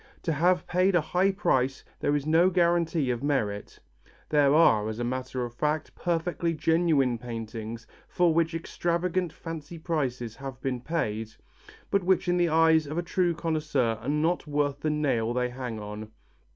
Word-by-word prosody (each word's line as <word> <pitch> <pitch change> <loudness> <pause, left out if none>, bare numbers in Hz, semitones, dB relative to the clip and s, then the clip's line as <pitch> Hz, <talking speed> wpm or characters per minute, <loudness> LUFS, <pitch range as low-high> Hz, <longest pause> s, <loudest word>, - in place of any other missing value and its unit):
To 165 - 0
have 175 +4 +2
paid 185 +1 +2
a - - +6
high 180 +5 +1
price 135 -9 0 0.2
is 145 -1 +1
no 165 +4 +4
guarantee 170 -5 +2
of 120 -1 -3
merit. 110 -8 -2 0.5
There 145 -2 +4
are, 110 -10 +4
as 110 - -5
a 120 - -2
matter 130 0 -3
of 120 - -8
fact, 150 +5 -1
perfectly 170 -1 -1
genuine 155 -6 +2
paintings 115 -1 -6 0.2
for 175 -2 +2
which 165 0 +1
extravagant 175 +1 -1
fancy 165 0 -8
prices 130 -9 -2
have 135 -2 -7
been 130 -2 -3
paid, 110 -8 -3 0.6
but 200 -1 +2
which 185 0 +2
in 175 0 +2
the 175 -1 +2
eyes 160 -1 +4
of 155 +3 -5
a 175 - 0
true 175 -1 0
connoisseur 150 -8 -1
are 125 - -4
not 160 +3 0
worth 145 -1 0
the 155 - -1
nail 135 -7 0
they 125 0 0
hang 125 -3 -5
on. 105 +1 -7
150 Hz, 165 wpm, -27 LUFS, 125-170 Hz, 0.6 s, a